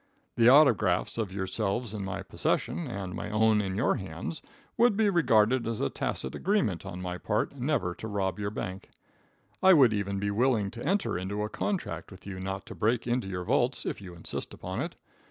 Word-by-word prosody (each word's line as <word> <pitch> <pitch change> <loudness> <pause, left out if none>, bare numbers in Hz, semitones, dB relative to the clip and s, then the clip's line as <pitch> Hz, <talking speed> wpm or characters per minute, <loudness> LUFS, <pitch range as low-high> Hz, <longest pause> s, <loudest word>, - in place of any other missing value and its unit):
The 120 0 +6
autographs 125 -9 +4
of 105 -4 -2
yourselves 100 +4 -2
in 105 -2 -4
my 95 0 -4
possession, 155 - -1
and 100 -6 -5
my - - -5
own 110 0 +3
in 95 -2 -3
your 110 - +2
hands, 95 - -6 0.3
would 235 -3 +4
be 215 -2 +3
regarded 120 - +3
as 115 -2 -2
a 70 - 0
tacit 65 - -3
agreement 120 - 0
on 90 -1 -6
my 90 0 -4
part 110 +7 -1
never 130 - 0
to 110 - -7
rob 100 -2 -1
your 100 0 -1
bank. 100 -3 -6 0.7
I 190 0 +8
would 130 -9 +6
even 100 -1 -1
be 100 +1 -1
willing 110 -2 +2
to 120 - -8
enter 190 - 0
into 100 +3 -3
a 105 - -2
contract 195 - -3
with 95 -2 -14
you 100 -2 -6
not 95 +1 -4
to - - -8
break 115 +2 +1
into 120 -3 0
your 90 -2 -3
vaults, 125 +5 +1
if - - -3
you 90 -3 -9
insist 85 - -6
upon - - -4
it. - - -4
105 Hz, 200 wpm, -29 LUFS, 95-125 Hz, 0.7 s, I